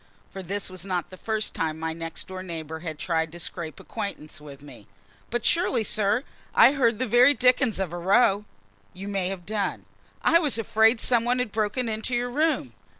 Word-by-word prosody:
for 195 - -7
this 195 +3 -3
was 185 -1 -7
not 180 -3 -3
the - - -9
first 215 +2 -3
time 160 -1 -2
my 160 0 -2
next 165 -1 -6
door 185 0 -6
neighbor 160 -3 -6
had 160 -2 -6
tried 160 -1 -1
to 175 - -10
scrape 165 -4 -5
acquaintance 200 -9 -6
with 140 -1 -12
me. 145 - -13 0.4
"But 240 -1 -2
surely, 335 -9 +3
sir, 215 +3 +1 0.3
I - - +8
heard 240 -6 +2
the 255 - -1
very 250 +5 +5
dickens 250 -2 +3
of 190 -3 -3
a 175 - -4
row?" 200 +2 +3 0.5
"You 195 +2 -8
may 195 -3 -1
have 190 -3 -6
done." 205 -1 -2 0.4
"I 335 - +5
was 295 -8 +1
afraid 225 +1 +3
some 235 -1 +3
one 245 +1 +1
had 250 -4 -1
broken 220 +3 -1
into 220 +3 -2
your 245 +1 -1
room!" 310 +4 0
205 Hz, 200 wpm, -26 LUFS, 175-240 Hz, 0.5 s, I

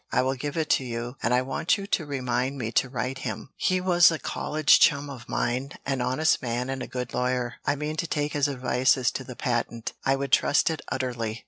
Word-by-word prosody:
I 125 - +2
will 130 +1 +1
give 145 +4 -5
it 160 -2 0
to - - +3
you, 120 0 -5
and 115 - 0
I 125 +1 +3
want 135 +9 0
you 200 - -6
to 165 -6 -1
remind 130 -1 -1
me 115 -3 -3
to 130 - +2
write 130 +1 -3
him 130 - -5
he 185 0 +1
was 175 -1 +6
a 165 - -1
college 155 +1 +2
chum 145 0 +3
of 120 -3 -10
mine, 130 +3 -1
an 135 -2 -1
honest 130 +6 +2
man 125 +1 -2
and 135 -1 -4
a - - -5
good 125 -1 -5
lawyer. 125 -1 -1
I 145 - +3
mean 150 +2 -4
to 170 - -1
take 150 -1 -1
his 145 -1 +2
advice 130 -1 +2
as 125 -3 +1
to 130 - -5
the 125 -1 -9
patent; 120 -2 -2
I 135 - +3
would 135 -1 -4
trust 145 - +4
it 160 - -4
utterly." 120 -4 -2
130 Hz, 235 wpm, -26 LUFS, 125-145 Hz, -, was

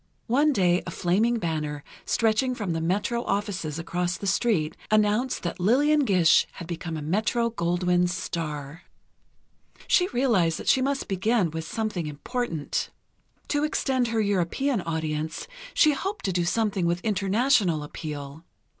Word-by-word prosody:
One 285 +6 +3
day 180 -7 +2
a - - -2
flaming 205 +8 +1
banner, 155 -6 -3 0.2
stretching 230 +3 +2
from 205 -7 -2
the 165 - -2
Metro 205 +8 0
offices 195 -8 -2
across 175 +2 -2
the - - -7
street, 190 -7 +1
announced 215 +4 +2
that 175 +2 -3
Lillian 285 +9 +3
Gish 180 -7 +4
had 170 - -8
become 170 -1 -4
a 150 - -5
Metro 220 +8 0
Goldwyn 180 -2 +1
star. 165 -4 -4 1.0
She 360 - +3
realized 225 - +2
that - - -8
she 260 - +4
must 275 +1 -1
begin 195 -2 +1
with 160 0 -5
something 210 -5 -3
important. 160 - -3 0.6
To 290 0 +1
extend 265 -4 0
her 225 -1 0
European 205 +5 0
audience, 160 -1 -3 0.3
she 305 - +6
hoped 390 +8 -4
to 190 - 0
do 175 -1 +1
something 195 -2 0
with 175 +1 0
international 200 - +2
appeal. 150 0 -7
190 Hz, 145 wpm, -26 LUFS, 165-235 Hz, 1.0 s, she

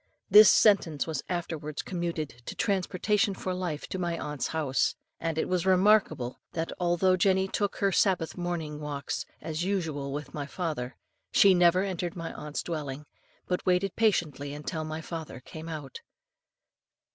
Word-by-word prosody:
This 210 +1 +10
sentence 185 -8 +4
was 160 -4 -3
afterwards 160 -4 -3
commuted 170 -4 -3 0.2
to - - -5
transportation 195 +1 +1
for 185 0 -3
life 175 -5 -3
from 190 - -4
my 170 -1 -1
aunt's 150 -4 -3
house; 150 -4 0 0.2
and 165 -1 -2
it - - 0
was 180 -2 0
remarkable, 190 - +3
that 165 0 -2
although 180 +1 +3
Jenny 190 +1 +3
took 205 +1 -1
her 200 -1 +1
Sabbath 180 -4 +2
morning 170 -4 -3
walks 145 -2 -4
as 160 +1 -3
usual 160 -8 -2
with 145 -1 -5
my 145 -2 -4
father, 150 -8 -3 0.4
she 195 -1 +7
never 180 +1 +4
entered 180 -3 -3
my 165 -2 -5
aunt's 150 0 -5
dwelling, 150 -3 -4 0.4
but 180 - -1
waited 185 +1 +1
patiently 150 -10 +1
until 155 +2 -4
my 155 +1 -5
father 160 -5 -6
came 160 +5 -9
out." 150 -5 -7
170 Hz, 155 wpm, -28 LUFS, 150-185 Hz, 0.4 s, This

